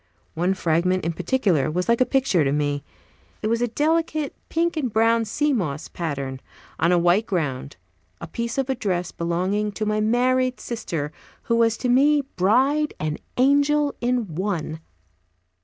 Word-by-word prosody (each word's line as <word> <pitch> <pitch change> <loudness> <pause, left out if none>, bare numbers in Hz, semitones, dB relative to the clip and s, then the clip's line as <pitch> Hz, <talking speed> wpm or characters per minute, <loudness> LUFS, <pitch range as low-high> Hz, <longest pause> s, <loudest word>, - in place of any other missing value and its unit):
One 180 +4 0
fragment, 180 +1 +1
in 165 - 0
particular, 180 - +1
was 180 +3 -2
like 235 +1 +2
a 255 - +4
picture 250 - +2
to 135 - +1
me. 145 -1 -1 0.6
It 215 - 0
was 230 +1 +1
a 245 - +2
delicate 310 +3 0 0.2
pink 335 +1 0
and 270 -7 -1
brown 225 +1 +3
sea 295 +7 0
moss 155 - -2
pattern, 140 -5 -4 0.4
on 170 +3 +3
a 180 - +4
white 175 +6 +3
ground, 140 - -3 0.4
a - - -6
piece 235 - -4
of 270 -1 0
a 265 - +1
dress 185 -8 -2
belonging 185 +5 -1
to 215 - -3
my 215 0 0
married 255 +3 +2
sister, 165 -11 -4 0.3
who 230 - +1
was 230 -1 +3
to 255 - -2
me 285 +4 +4
bride 265 +11 +2
and 155 0 -3 0.2
angel 285 +2 +3
in 240 -7 -1
One. 170 -3 -3
215 Hz, 165 wpm, -23 LUFS, 170-255 Hz, 0.6 s, a